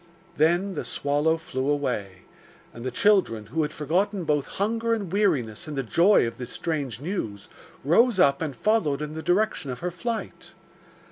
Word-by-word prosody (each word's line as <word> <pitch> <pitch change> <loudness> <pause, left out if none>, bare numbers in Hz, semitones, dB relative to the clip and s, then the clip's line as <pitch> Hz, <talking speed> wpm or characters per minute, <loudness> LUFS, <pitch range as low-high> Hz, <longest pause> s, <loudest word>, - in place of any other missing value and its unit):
Then 175 +6 +2
the - - -3
swallow 145 +3 0
flew 160 -5 -3
away, 115 -10 -2 0.5
and 115 - -9
the 130 - -1
children, 130 - +2
who 135 +10 -2
had 150 -1 -1
forgotten 180 +7 -1
both 150 -3 0
hunger 230 +3 0
and 200 -6 -5
weariness 135 - 0
in 150 - -5
the 135 - -1
joy 170 - +4
of 115 - -5
this 125 -1 -6
strange 145 -7 -3
news, 135 - -4 0.4
rose 225 - +4
up 140 -4 +4
and 150 -5 -3
followed 155 - +1
in 150 0 -5
the 160 - -5
direction 180 -4 0
of 125 - -5
her 180 +1 -2
flight. 225 +6 -5
155 Hz, 175 wpm, -25 LUFS, 135-195 Hz, 0.5 s, joy